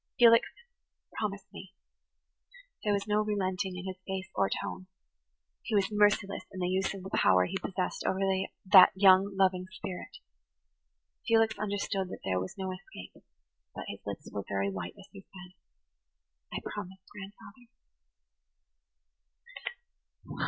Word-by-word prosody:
"Felix, 230 Hz, -1 st, +6 dB, 0.7 s
promise 200 Hz, -2 st, -3 dB
me." 195 Hz, 0 st, -11 dB, 1.1 s
There 210 Hz, -, +1 dB
was 200 Hz, -1 st, 0 dB
no 210 Hz, 0 st, +2 dB
relenting 190 Hz, -2 st, -1 dB
in 180 Hz, -, -6 dB
his 190 Hz, -1 st, -5 dB
face 190 Hz, -1 st, -3 dB
or 195 Hz, -, +1 dB
tone. 185 Hz, -, -4 dB, 0.7 s
He 220 Hz, -, -2 dB
was 200 Hz, 0 st, +2 dB
merciless 205 Hz, -2 st, +2 dB
in 190 Hz, -, -7 dB
the 180 Hz, -, 0 dB
use 190 Hz, +1 st, 0 dB
of 190 Hz, -, -8 dB
the 190 Hz, -, -8 dB
power 90 Hz, -1 st, +4 dB
he -, -, -5 dB
possessed 185 Hz, -1 st, -3 dB
over 190 Hz, -, +1 dB, 0.5 s
that 185 Hz, -1 st, +9 dB
young, 190 Hz, 0 st, +5 dB
loving 185 Hz, -1 st, +2 dB
spirit. 185 Hz, -1 st, -7 dB, 1.1 s
Felix 225 Hz, -1 st, +4 dB
understood 200 Hz, -2 st, -2 dB
that -, -, -8 dB
there 95 Hz, -1 st, 0 dB
was 95 Hz, 0 st, -6 dB
no 190 Hz, -1 st, -3 dB
escape; 185 Hz, -, -10 dB, 0.6 s
but -, -, -6 dB
his -, -, -6 dB
lips -, -, -6 dB
were 100 Hz, -, -4 dB
very 100 Hz, 0 st, 0 dB
white 95 Hz, -2 st, -6 dB
as 195 Hz, -, -14 dB
he 195 Hz, -, -11 dB
said, 185 Hz, -1 st, -13 dB, 1.0 s
"I -, -, -3 dB
promise, 190 Hz, -2 st, -6 dB
grandfather." 205 Hz, +4 st, -12 dB
190 Hz, 140 wpm, -30 LUFS, 185-205 Hz, 1.1 s, that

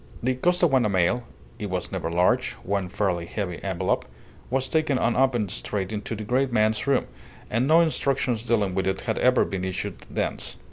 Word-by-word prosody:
The 130 Hz, +2 st, +2 dB
Costaguana 135 Hz, -5 st, +3 dB
mail 95 Hz, +6 st, +1 dB, 0.3 s
(it 105 Hz, -, -4 dB
was 90 Hz, -1 st, -3 dB
never -, -, -2 dB
large 90 Hz, +2 st, +2 dB
one 95 Hz, -1 st, -1 dB
fairly 90 Hz, -4 st, -1 dB
heavy 90 Hz, -4 st, -4 dB
envelope) 95 Hz, -1 st, 0 dB, 0.5 s
was 130 Hz, +1 st, 0 dB
taken 155 Hz, -4 st, +1 dB
unopened 120 Hz, -5 st, +2 dB
straight 100 Hz, -1 st, -3 dB
into 105 Hz, +1 st, -4 dB
the 110 Hz, -, -5 dB
great 130 Hz, +4 st, +1 dB
man's 110 Hz, +1 st, +2 dB
room, 140 Hz, -2 st, +3 dB, 0.5 s
and 120 Hz, +4 st, +1 dB
no 160 Hz, +3 st, +6 dB
instructions 135 Hz, -7 st, +1 dB
dealing 110 Hz, -5 st, +1 dB
with 95 Hz, 0 st, 0 dB
it 95 Hz, 0 st, -1 dB
had 110 Hz, -2 st, -2 dB
ever 125 Hz, 0 st, +4 dB
been 95 Hz, -1 st, -4 dB
issued 95 Hz, 0 st, -4 dB
thence. -, -, -3 dB
110 Hz, 175 wpm, -25 LUFS, 95-130 Hz, 0.5 s, no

